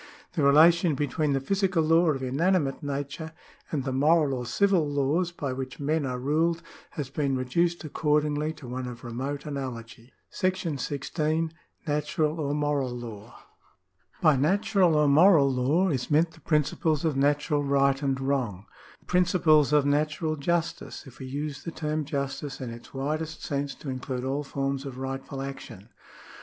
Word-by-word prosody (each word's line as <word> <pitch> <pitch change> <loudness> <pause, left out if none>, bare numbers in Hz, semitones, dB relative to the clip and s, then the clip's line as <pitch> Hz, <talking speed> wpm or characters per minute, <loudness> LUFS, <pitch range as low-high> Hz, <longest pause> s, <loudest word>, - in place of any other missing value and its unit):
The 170 - -1
relation 160 +3 +5
between 145 +1 0
the 135 - +1
physical 190 +3 +1
law 165 +2 +4
of 135 -3 -1
inanimate 145 +2 +1
nature 145 +2 -4 0.4
and 145 -4 -2
the 130 - -2
moral 150 +1 +3
or 125 -2 -4
civil 180 - +2
laws 145 +5 +1
by 140 -6 -4
which 130 0 -6
men 145 0 0
are 125 -1 -3
ruled 160 +6 0 0.3
has 140 -3 -4
been 140 -2 0
reduced 170 +8 0
accordingly 150 0 0
to 150 -5 -12
one 125 +1 -4
of 120 0 -8
remote 130 +4 -4
analogy. 125 -4 -6 0.2
§ 185 -6 -1
16. 155 +4 -1 0.3
Natural 150 +1 0
or 145 -1 -1
Moral 145 -3 0
Law. 120 -2 -9 0.8
By 155 -3 +6
natural 190 +4 +3
or 150 -1 +4
moral 150 -1 +6
law 140 +9 +2
is 130 -6 -2
meant 160 +2 +3
the 160 0 -18
principles 155 0 +1
of 155 -3 +1
natural 145 +2 +1
right 140 0 +2
and 135 -2 0
wrong 130 -8 -1 0.2
— - - -22
the - - -28
principles 170 -5 +3
of 150 -2 +4
natural 155 +2 0
justice, 170 +3 -2
if 125 -3 -14
we 130 - -7
use 145 +1 -4
the - - -4
term 155 -1 -2
justice 140 -1 -4
in 125 -3 -5
its 115 +1 -11
widest 155 +4 -3
sense 140 -2 -2
to 140 - -6
include 130 -1 -4
all 135 +3 -1
forms 135 -1 -2
of 135 -3 -7
rightful 135 +1 -5
action. 125 -6 -9
145 Hz, 165 wpm, -27 LUFS, 135-160 Hz, 0.8 s, By